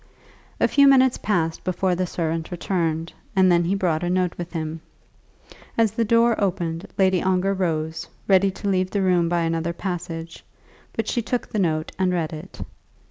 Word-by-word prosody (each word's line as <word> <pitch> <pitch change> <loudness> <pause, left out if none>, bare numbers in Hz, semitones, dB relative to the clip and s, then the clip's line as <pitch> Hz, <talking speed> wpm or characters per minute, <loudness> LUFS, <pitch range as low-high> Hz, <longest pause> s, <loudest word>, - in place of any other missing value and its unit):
A - - +4
few 280 -1 +5
minutes 260 -2 +5
passed 165 -6 -1
before 185 0 0
the 180 +1 -1
servant 165 -1 -2
returned, 170 -2 -2 0.2
and 190 -1 +5
then 170 0 +4
he 190 +4 +1
brought 175 -5 0
a 175 - -1
note 180 -1 +1
with 175 -1 -6
him. 160 -1 -4 1.0
As 225 -2 +3
the 230 +2 0
door 230 +1 +4
opened 175 -3 -2
Lady 190 -2 +3
Ongar 190 +1 +1
rose, 160 -4 -2 0.2
ready 195 0 +5
to 195 +2 -6
leave 185 -1 +1
the 200 0 0
room 175 -2 +2
by 175 0 +1
another 165 0 -1
passage; 170 -2 -5 0.5
but - - -2
she 240 - 0
took 245 +2 -2
the 215 - -2
note 160 -4 0
and 185 -1 +2
read 170 -2 -1
it. 160 +5 -9
180 Hz, 180 wpm, -23 LUFS, 165-195 Hz, 1.0 s, few